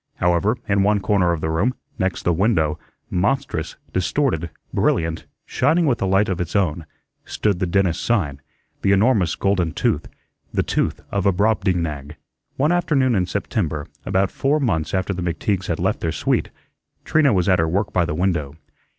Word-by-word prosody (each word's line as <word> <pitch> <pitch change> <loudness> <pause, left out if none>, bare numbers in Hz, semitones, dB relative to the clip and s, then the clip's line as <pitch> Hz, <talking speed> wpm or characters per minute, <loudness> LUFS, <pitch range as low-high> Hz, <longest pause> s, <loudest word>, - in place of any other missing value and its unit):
However, 90 +7 +1
in 100 -1 +2
one 105 +1 +3
corner 95 -3 +2
of 85 -2 -2
the 80 - -1
room, 105 +11 +1 0.2
next 95 -1 -1
the 85 - +2
window, 80 -5 +1 0.3
monstrous, 95 - -1 0.2
distorted, 90 - 0 0.2
brilliant, 80 0 0 0.2
shining 160 +6 +2
with 130 -6 +1
a 95 - +1
light 95 +2 +3
of 90 -1 -2
its 85 +2 -4
own, 85 -5 0 0.4
stood 100 -4 -1
the 95 - 0
dentist's 90 -1 +1
sign, 80 -12 0 0.4
the 100 - +3
enormous 100 -4 +3
golden 95 -5 0
tooth, - - 0 0.4
the - - 0
tooth - - -1
of 100 -1 0
a - - +5
Brobdingnag. 90 -8 0 0.4
One 150 +5 +2
afternoon 145 -8 +2
in 90 -4 +1
September, 85 -7 -2 0.2
about 95 0 +1
four 145 +3 +1
months 85 - 0
after 95 +1 0
the 90 - -5
McTeagues 90 +2 -1
had - - -1
left - - 0
their - - -1
suite, - - 0 0.6
Trina 155 -3 +3
was 90 -4 +1
at 95 -3 +4
her 80 - +2
work 95 +5 -1
by 90 - +3
the 75 - -3
window. 80 -5 -1
95 Hz, 175 wpm, -21 LUFS, 85-105 Hz, 0.6 s, a